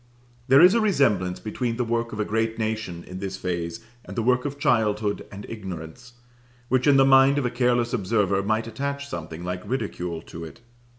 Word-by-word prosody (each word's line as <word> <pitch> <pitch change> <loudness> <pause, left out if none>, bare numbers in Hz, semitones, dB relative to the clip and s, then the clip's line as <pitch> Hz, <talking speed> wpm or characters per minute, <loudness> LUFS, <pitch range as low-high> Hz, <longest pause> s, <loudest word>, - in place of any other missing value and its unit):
There 135 +2 +7
is 180 +2 +8
a 230 - +3
resemblance 115 - +2
between 115 +2 -3
the 125 - +1
work 115 0 -1
of 110 - -6
a 105 - +1
great 110 +1 -1
nation, 110 -6 -3
in 90 0 -8
this 95 -1 -4
phase, 90 +3 -3 0.2
and - - -10
the 115 - +1
work 125 +2 +2
of 145 0 -3
childhood 105 -5 +1
and 100 0 -8
ignorance, 95 +3 -8 0.6
which, 130 +2 +2
in 140 -1 +6
the 135 - +6
mind 135 +1 +6
of 145 - 0
a 125 - 0
careless 120 -1 +1
observer, 100 -3 +1
might 110 +3 0
attach 140 +5 -4
something 85 - -6
like 90 0 -4
ridicule 90 -9 -4
to 85 - -9
it. 80 - -10
110 Hz, 195 wpm, -25 LUFS, 95-125 Hz, 0.6 s, is